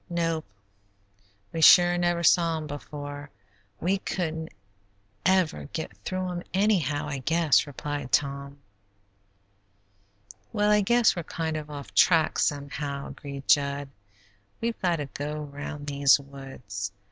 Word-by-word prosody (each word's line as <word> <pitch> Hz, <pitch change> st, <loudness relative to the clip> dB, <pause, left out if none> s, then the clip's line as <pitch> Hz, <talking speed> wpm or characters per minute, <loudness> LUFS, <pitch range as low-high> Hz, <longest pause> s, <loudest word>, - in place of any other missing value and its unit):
"Nope, 165 Hz, -2 st, -1 dB, 1.1 s
we 165 Hz, -, -2 dB
sure 175 Hz, +2 st, +8 dB
never 175 Hz, -1 st, +1 dB
saw 170 Hz, -1 st, +4 dB
'em 155 Hz, -, -5 dB
before. 145 Hz, 0 st, -7 dB, 0.5 s
We 190 Hz, +3 st, +1 dB
couldn't 160 Hz, -4 st, -3 dB, 0.8 s
ever 180 Hz, -, +2 dB
get 100 Hz, -, -4 dB
through 185 Hz, -, -3 dB
'em, 175 Hz, 0 st, -5 dB
anyhow, 170 Hz, -8 st, +1 dB
I 140 Hz, -2 st, -3 dB
guess," 160 Hz, +1 st, +3 dB
replied 145 Hz, -1 st, -5 dB
Tom. 140 Hz, 0 st, 0 dB, 1.9 s
"Well, 210 Hz, 0 st, +2 dB
I 210 Hz, 0 st, +5 dB
guess 235 Hz, +3 st, +4 dB
we're 175 Hz, -, -2 dB
kind 160 Hz, 0 st, -3 dB
of 150 Hz, -1 st, -5 dB
off 145 Hz, -2 st, -8 dB
the -, -, -24 dB
track, 165 Hz, -3 st, +4 dB
somehow," 140 Hz, -1 st, -2 dB
agreed 140 Hz, -1 st, -8 dB
Jud. 140 Hz, -1 st, +2 dB, 0.7 s
"We've 230 Hz, 0 st, -3 dB
got 175 Hz, -2 st, +2 dB
to 150 Hz, -3 st, -3 dB
go 150 Hz, +2 st, -5 dB
round 145 Hz, +1 st, -7 dB
these 140 Hz, -1 st, +4 dB
woods. 135 Hz, -8 st, -7 dB
150 Hz, 130 wpm, -27 LUFS, 140-175 Hz, 1.9 s, sure